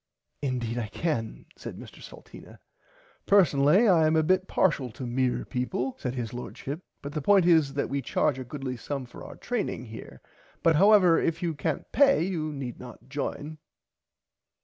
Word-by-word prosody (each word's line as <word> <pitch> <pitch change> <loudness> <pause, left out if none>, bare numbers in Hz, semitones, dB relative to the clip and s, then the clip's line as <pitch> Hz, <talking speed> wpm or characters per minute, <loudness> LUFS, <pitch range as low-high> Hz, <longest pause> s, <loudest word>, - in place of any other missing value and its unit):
Indeed 120 -4 -2
I 110 - -3
can 115 -2 -3
said - - -8
Mr - - -12
Salteena. - - -13 0.7
Personally 180 - +5
I 165 -5 +5
am 155 - +2
a 160 - +3
bit 185 +3 +2
parshial 140 -9 +1
to 130 - -6
mere 125 +1 -1
people 125 0 -3
said 125 0 -3
his 120 -3 -4
Lordship 135 +4 -6 0.2
but 140 +1 -6
the 150 - -2
point 195 +3 +4
is 160 -5 +4
that 140 - 0
we 140 0 -2
charge 135 +2 0
a - - -4
goodly 130 0 -5
sum 135 +2 -5
for 120 - -12
our - - -10
training 220 - -3
here 110 0 -10 0.4
but 165 -1 +4
however 195 -3 +6
if 165 +1 -1
you 170 -2 0
cant 145 - -3
pay 275 - +4
you 165 -4 -2
need 135 -4 -6
not 125 +1 -12
join. 150 +2 -5
145 Hz, 170 wpm, -27 LUFS, 125-165 Hz, 0.7 s, however